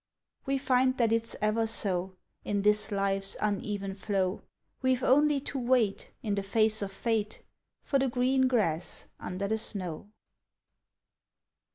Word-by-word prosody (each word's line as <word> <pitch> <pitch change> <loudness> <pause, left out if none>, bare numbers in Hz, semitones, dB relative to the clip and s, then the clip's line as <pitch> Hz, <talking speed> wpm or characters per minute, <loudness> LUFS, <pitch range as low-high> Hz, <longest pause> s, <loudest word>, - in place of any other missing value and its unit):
We 275 0 +1
find 260 -1 +2
that 230 -2 +2
it's 230 0 0
ever 215 +2 +1
so 190 -4 -1 0.3
In 205 -1 -1
this 210 0 +3
life's 195 -1 0
uneven 200 -1 -2
flow; 195 -1 -1 0.4
We've 260 -1 +1
only 290 +2 +4
to 275 0 -4
wait, 240 -5 +1
In 210 -3 -1
the 200 - 0
face 215 +2 +2
of 200 -1 -3
fate, 220 0 -2 0.4
For 275 - +1
the 270 - +2
green 260 +2 +2
grass 180 -10 0
under 185 +2 -3
the 220 +2 0
snow. 190 -3 -4
215 Hz, 140 wpm, -29 LUFS, 195-250 Hz, 0.4 s, only